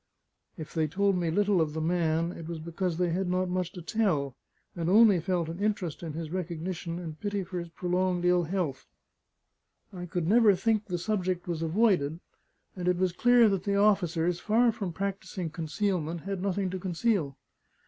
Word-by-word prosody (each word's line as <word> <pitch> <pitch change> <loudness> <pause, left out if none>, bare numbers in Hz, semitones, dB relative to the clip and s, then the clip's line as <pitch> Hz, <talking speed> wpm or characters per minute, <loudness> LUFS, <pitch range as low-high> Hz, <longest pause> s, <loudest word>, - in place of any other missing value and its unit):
If 155 - -8
they 160 -2 +1
told 195 +4 +1
me 175 -2 0
little 200 +1 +2
of 150 -2 -1
the 160 - -3
man, 165 0 +1
it 165 -2 -8
was 170 -1 -4
because 170 +2 -3
they 175 -1 +1
had 180 +2 -1
not 185 0 0
much 180 -1 -1
to 180 - -8
tell, 155 - 0 0.4
and 170 -1 -2
only 210 -2 +6
felt 175 -1 -1
an 165 +3 -6
interest 200 -7 -1
in 165 -3 -5
his 160 0 -5
recognition 175 -1 -4
and 160 -3 -7
pity 205 0 -2
for 180 0 -5
his 170 0 -7
prolonged 180 +1 -1
ill 180 -1 +3
health. 165 -6 -3 1.1
I 180 -1 -6
could 170 -1 -2
never 215 0 +5
think 215 +3 +1
the 180 -2 -2
subject 185 -1 -2
was 170 -2 -2
avoided; 165 -3 +2 0.6
and 180 -2 -4
it 180 -1 +3
was 185 -1 +1
clear 245 +3 +5
that 195 -2 -1
the 200 -1 0
officers, 180 -4 +2
far 230 +2 +3
from 205 -5 -4
practising 190 -2 -4
concealment, 165 +1 -2
had 195 0 -4
nothing 195 -1 -1
to 185 - -4
conceal. 180 - -1
180 Hz, 185 wpm, -28 LUFS, 165-195 Hz, 1.1 s, only